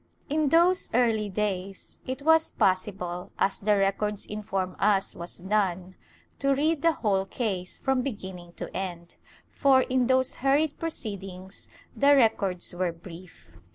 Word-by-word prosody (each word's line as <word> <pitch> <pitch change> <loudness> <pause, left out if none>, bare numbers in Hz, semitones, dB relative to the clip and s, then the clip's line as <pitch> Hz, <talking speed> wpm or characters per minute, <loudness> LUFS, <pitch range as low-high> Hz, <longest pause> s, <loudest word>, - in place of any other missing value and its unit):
^ - - -2
In 305 -2 +2
those 345 +4 +4
early 225 -4 +2
days 195 -1 -3
it 260 +2 -4
was 320 +1 +5
possible, 185 -2 -1
as 195 - +1
the 205 0 +2
records 200 +1 0
inform 195 -3 -3
us 195 -2 +2
was 170 +1 -5
done, 185 -1 -1 0.5
to 275 0 +2
read 305 +2 +1
the 330 0 +4
whole 195 -7 0
case 190 -6 -2
from 265 -1 0
beginning 190 -8 -6
to - - -8
end, 175 -3 -5 0.4
for, 270 -2 +4
in 255 -1 +1
those 260 0 +2
hurried 285 +3 +2
proceedings, 195 - -5 0.3
the 285 +1 +5
records 200 -9 +1
were 175 0 -1
brief. 165 - -13
205 Hz, 145 wpm, -27 LUFS, 185-260 Hz, 0.5 s, was